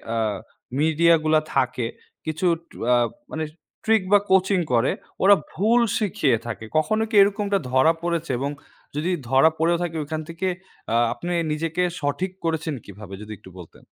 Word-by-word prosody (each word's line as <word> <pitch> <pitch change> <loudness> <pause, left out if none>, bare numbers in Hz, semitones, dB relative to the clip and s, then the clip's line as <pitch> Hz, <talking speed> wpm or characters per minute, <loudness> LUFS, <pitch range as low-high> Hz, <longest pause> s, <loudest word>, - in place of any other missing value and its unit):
আ - - 0 0.6
media 160 +2 +4
গুলা 155 0 +4 0.2
থাকে 125 -3 +1 0.4
কিছু 160 +3 -2 0.5
আ - - +6 0.4
মানে 160 - -3 0.4
ট্রিক 220 -3 +3
বা 205 - +7
কোচিং 190 0 +4
করে, 120 +2 +3 0.3
ওরা 200 +1 +8 0.2
ভুল 225 +7 +3 0.2
শিখিয়ে 155 - +1
থাকে। 115 -1 -5
কখনো 215 +8 +2
কি 220 - -3
এরকমটা 200 0 +2
ধরা 130 +5 +5
পড়েছে 170 -3 -1
এবং 140 +2 -2 0.4
যদি 160 +5 -1 0.2
ধরা 135 +5 +6
পড়েও 170 +2 +2
থাকে 165 -2 -3
ওখান 155 +1 -4
থেকে 165 +3 -3 0.5
আ - - +3 0.2
আপনি 175 - -5 0.2
নিজেকে 165 +3 -1 0.2
সঠিক 145 +6 -2
করেছেন 160 -1 -1
কিভাবে 100 0 -11
যদি 105 0 -9
একটু 95 - -15
বলতেন? 85 - -14
160 Hz, 155 wpm, -23 LUFS, 140-185 Hz, 0.6 s, ওরা